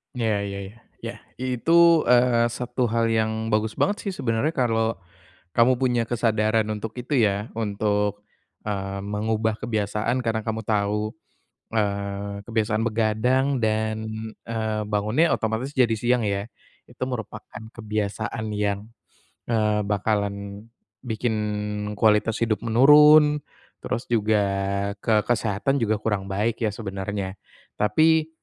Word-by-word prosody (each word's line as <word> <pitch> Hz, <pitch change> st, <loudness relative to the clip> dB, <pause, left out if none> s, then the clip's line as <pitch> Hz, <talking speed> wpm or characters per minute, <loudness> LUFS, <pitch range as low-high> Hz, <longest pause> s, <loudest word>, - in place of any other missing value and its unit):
Iya 115 Hz, -3 st, +1 dB
iya 100 Hz, 0 st, -5 dB
iya. 105 Hz, -, -14 dB, 0.3 s
Iya -, -, -4 dB, 0.3 s
itu, 130 Hz, +4 st, -1 dB, 0.4 s
eee, 120 Hz, -1 st, +4 dB
satu 125 Hz, 0 st, -1 dB
hal 115 Hz, +1 st, +1 dB
yang 110 Hz, -1 st, +1 dB, 0.2 s
bagus 110 Hz, +1 st, +1 dB
banget 205 Hz, +1 st, +2 dB
sih -, -, 0 dB
sebenernya 130 Hz, +4 st, 0 dB
kalau 115 Hz, -3 st, +1 dB, 0.6 s
kamu 120 Hz, +2 st, +5 dB
punya 125 Hz, -3 st, +2 dB
kesadaran 110 Hz, -2 st, +1 dB
untuk 105 Hz, +1 st, -5 dB
itu 125 Hz, +4 st, -3 dB
ya. 100 Hz, +2 st, -2 dB
Untuk, 105 Hz, -1 st, -1 dB, 0.4 s
eee, 100 Hz, -1 st, -3 dB
mengubah 110 Hz, +1 st, -1 dB
kebiasaan 110 Hz, +2 st, -1 dB
karena 110 Hz, -1 st, 0 dB
kamu 110 Hz, 0 st, -3 dB
tahu, 105 Hz, 0 st, 0 dB, 0.6 s
eee, 100 Hz, -1 st, -2 dB
kebiasaan 110 Hz, -1 st, 0 dB
begadang 115 Hz, +4 st, +1 dB, 0.2 s
dan, 110 Hz, 0 st, 0 dB, 0.5 s
eee, 110 Hz, -2 st, -2 dB
bangunnya 110 Hz, +11 st, +2 dB
otomatis 110 Hz, +5 st, -2 dB
jadi 120 Hz, -4 st, +3 dB
siang 120 Hz, +2 st, +1 dB
ya. 100 Hz, 0 st, -1 dB, 0.4 s
Itu -, -, -15 dB
merupakan 120 Hz, -1 st, -7 dB
kebiasaan 110 Hz, 0 st, -3 dB
yang, 100 Hz, -1 st, 0 dB, 0.7 s
eee, 105 Hz, -2 st, +2 dB
bakalan 100 Hz, 0 st, -2 dB, 0.3 s
bikin 115 Hz, -1 st, -2 dB, 0.6 s
kualitas 110 Hz, +1 st, +3 dB
hidup 110 Hz, -2 st, -1 dB
menurun 150 Hz, +5 st, +6 dB, 0.4 s
terus 120 Hz, -, -3 dB
juga 110 Hz, -2 st, +1 dB, 0.6 s
ke 110 Hz, -1 st, +2 dB
kesehatan 120 Hz, +4 st, 0 dB
juga 110 Hz, -1 st, +1 dB
kurang 105 Hz, -2 st, -2 dB
baik 105 Hz, +4 st, -1 dB
ya 110 Hz, -, +1 dB
sebenarnya. 100 Hz, -2 st, -5 dB, 0.4 s
Tapi, 155 Hz, +9 st, +3 dB
110 Hz, 120 wpm, -24 LUFS, 105-120 Hz, 0.7 s, menurun